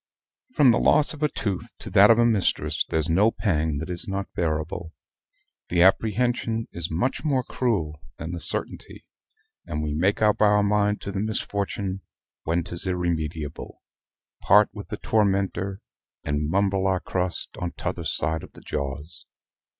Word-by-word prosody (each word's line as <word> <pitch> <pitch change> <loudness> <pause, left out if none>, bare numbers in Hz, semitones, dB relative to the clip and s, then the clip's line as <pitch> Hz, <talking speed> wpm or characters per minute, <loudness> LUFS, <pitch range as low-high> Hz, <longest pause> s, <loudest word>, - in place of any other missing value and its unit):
From 140 -5 +6
the 115 - +2
loss 150 - +3
of 150 - -11
a 150 - +2
tooth 100 -2 -3
to 105 - -9
that 100 +1 +7
of 115 - +7
a 120 - +4
mistress 85 -8 +1
there's 80 -1 0
no 95 +7 +4
pang 80 -9 0
that 80 +5 -5
is 85 - -5
not 100 0 -4
bearable. 80 0 -2 0.8
The 85 0 +4
apprehension 115 +3 +2
is 85 -1 -4
much 90 +12 -1
more 135 -5 +1
cruel 85 - -1 0.2
than 80 +2 -5
the 90 - -4
certainty; - - -5 0.6
and 75 0 -3
we 75 -1 -2
make 95 +7 +1
up 105 -1 +2
our 105 -1 +5
mind 105 0 +1
to 100 - -5
the 95 - -3
misfortune 100 -2 -2 0.4
when 85 +1 +1
'tis 85 +2 -5
irremediable, 80 -4 -3 0.6
part 105 0 +5
with 105 -2 -8
the 105 - -5
tormentor, 100 -2 0 0.4
and 75 0 -1
mumble 95 +1 +1
our 95 -1 +1
crust 90 -1 -2
on 90 -1 -3
t'other 90 -2 -4
side 80 +2 -1
of - - -12
the - - -14
jaws. 75 +5 -5
95 Hz, 160 wpm, -25 LUFS, 80-105 Hz, 0.8 s, that